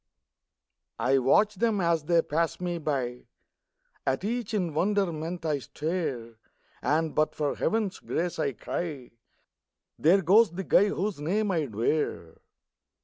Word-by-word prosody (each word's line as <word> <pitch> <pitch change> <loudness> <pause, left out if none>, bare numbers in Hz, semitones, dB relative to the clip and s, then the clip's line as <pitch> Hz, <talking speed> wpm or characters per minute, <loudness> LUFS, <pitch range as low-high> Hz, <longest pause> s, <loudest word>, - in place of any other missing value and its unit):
I 135 +1 +2
watch 205 - +3
them 220 0 +1
as 170 -3 +1
they 170 0 +3
pass 165 +2 -1
me 175 -1 -2
by; 130 -5 -3 0.8
At 135 +5 0
each 230 +1 -2
in 180 -7 -1
wonderment 175 -2 -1
I 150 -2 0
stare, 135 -7 -4 0.4
And, 155 +1 +1
"but 155 0 +1
for 145 -2 0
heaven's 215 -3 -1
grace," 170 0 -3
I 140 -3 0
cry, 145 0 -5 0.9
"There 185 +5 +4
goes 205 +6 +6
the 190 +2 -4
guy 190 - +5
whose 200 -3 -2
name 200 +7 0
I'd 150 - -2
wear!" 110 - -1
165 Hz, 135 wpm, -28 LUFS, 145-195 Hz, 0.9 s, goes